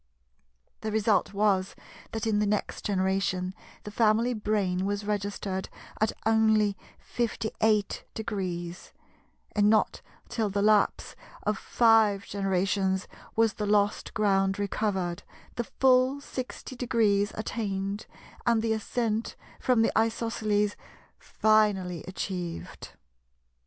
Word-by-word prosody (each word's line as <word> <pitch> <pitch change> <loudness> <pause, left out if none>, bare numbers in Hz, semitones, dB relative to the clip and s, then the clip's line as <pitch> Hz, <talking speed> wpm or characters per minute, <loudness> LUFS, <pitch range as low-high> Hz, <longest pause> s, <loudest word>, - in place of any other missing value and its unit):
The 220 - -3
result 215 -1 +2
was 200 -2 +1 0.4
that 225 0 -3
in 215 -2 +2
the 210 - +2
next 210 0 -2
generation 190 -1 0 0.3
the 210 - -7
family 225 +3 +3
brain 205 -4 0
was 205 0 -2
registered 200 -2 -3 0.3
at 215 - +2
only 220 -2 +3 0.4
58°, 210 -5 -2 0.6
and 205 -1 +4
not 215 0 +2 0.3
till 220 -3 -1
the 200 +1 0
lapse 210 -1 +2 0.3
of 210 0 +1
five 220 -4 +4
generations 190 -1 0 0.3
was 225 -1 +3
the 210 - -3
lost 205 0 +1
ground 195 -2 +2
recovered, 190 -3 -1 0.3
the 240 - -2
full 255 +1 +3
60° 240 -6 -1
attained, 200 -2 -3 0.4
and 230 -2 +3
the 225 -1 +2
Ascent 220 0 -2 0.2
from 245 -3 +3
the - - +2
Isosceles 220 -2 +1 0.4
finally 205 -6 +2
achieved. 180 -2 -5
210 Hz, 105 wpm, -28 LUFS, 195-220 Hz, 0.6 s, and